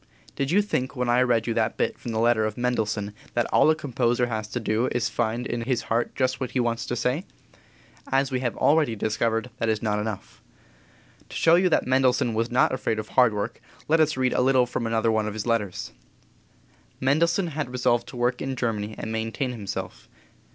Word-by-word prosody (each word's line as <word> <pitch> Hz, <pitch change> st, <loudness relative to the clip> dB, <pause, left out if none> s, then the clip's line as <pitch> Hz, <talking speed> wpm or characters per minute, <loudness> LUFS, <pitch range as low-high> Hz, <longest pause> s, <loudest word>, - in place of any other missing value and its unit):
Did 135 Hz, -1 st, -1 dB
you 200 Hz, +5 st, +3 dB
think 135 Hz, -9 st, -2 dB
when 125 Hz, -1 st, -1 dB
I 120 Hz, +1 st, +4 dB
read 120 Hz, -3 st, +2 dB
you 115 Hz, -, -1 dB
that 110 Hz, 0 st, 0 dB
bit -, -, -1 dB
from 120 Hz, -, -5 dB
the 110 Hz, -, -2 dB
letter 115 Hz, -1 st, +3 dB
of 110 Hz, -1 st, -2 dB
Mendelssohn 110 Hz, -4 st, -1 dB, 0.2 s
that 120 Hz, -1 st, +2 dB
all -, -, +5 dB
a 155 Hz, -, +4 dB
composer 125 Hz, -4 st, 0 dB
has 110 Hz, -3 st, -3 dB
to 120 Hz, -, -4 dB
do 110 Hz, +2 st, 0 dB
is 120 Hz, -, 0 dB
to -, -, -1 dB
find 120 Hz, +1 st, -1 dB
in 120 Hz, -2 st, -3 dB
his 120 Hz, 0 st, -1 dB
heart 115 Hz, +1 st, 0 dB
just 130 Hz, 0 st, 0 dB
what 130 Hz, -, -3 dB
he 130 Hz, -, +1 dB
wants 120 Hz, -1 st, -1 dB
to 120 Hz, -, -2 dB
say? 125 Hz, +8 st, 0 dB, 0.9 s
As 135 Hz, 0 st, +2 dB
we 130 Hz, -, 0 dB
have 125 Hz, -2 st, -2 dB
already 150 Hz, -6 st, +3 dB
discovered, 115 Hz, +2 st, -1 dB
that 115 Hz, -, 0 dB
is 110 Hz, 0 st, -1 dB
not 105 Hz, -1 st, 0 dB
enough. 105 Hz, -2 st, -6 dB, 0.9 s
To -, -, -10 dB
show 165 Hz, -, +4 dB
you 180 Hz, +2 st, +5 dB
that 155 Hz, -, +2 dB
Mendelssohn 130 Hz, -2 st, +2 dB
was 115 Hz, +1 st, 0 dB
not 125 Hz, +1 st, +3 dB
afraid 125 Hz, -4 st, -1 dB
of 110 Hz, -1 st, -5 dB
hard 125 Hz, -3 st, +4 dB
work 105 Hz, +3 st, -4 dB, 0.3 s
let 160 Hz, +2 st, +3 dB
us 155 Hz, -3 st, +2 dB
read 130 Hz, -1 st, +1 dB
a -, -, +2 dB
little 130 Hz, -1 st, +4 dB
from 120 Hz, -1 st, -3 dB
another 115 Hz, 0 st, +1 dB
of 105 Hz, -1 st, 0 dB
his 110 Hz, -, -4 dB
letters. 115 Hz, -5 st, -1 dB, 1.1 s
Mendelssohn 170 Hz, +7 st, +2 dB
had 155 Hz, -3 st, -3 dB
resolved 120 Hz, -1 st, +1 dB
to 125 Hz, -, -9 dB
work 120 Hz, +1 st, 0 dB
in 135 Hz, 0 st, -3 dB
Germany 110 Hz, -4 st, -2 dB
and 110 Hz, -, -5 dB
maintain 115 Hz, +4 st, -2 dB
himself. 95 Hz, -, -6 dB
120 Hz, 215 wpm, -25 LUFS, 110-130 Hz, 1.1 s, all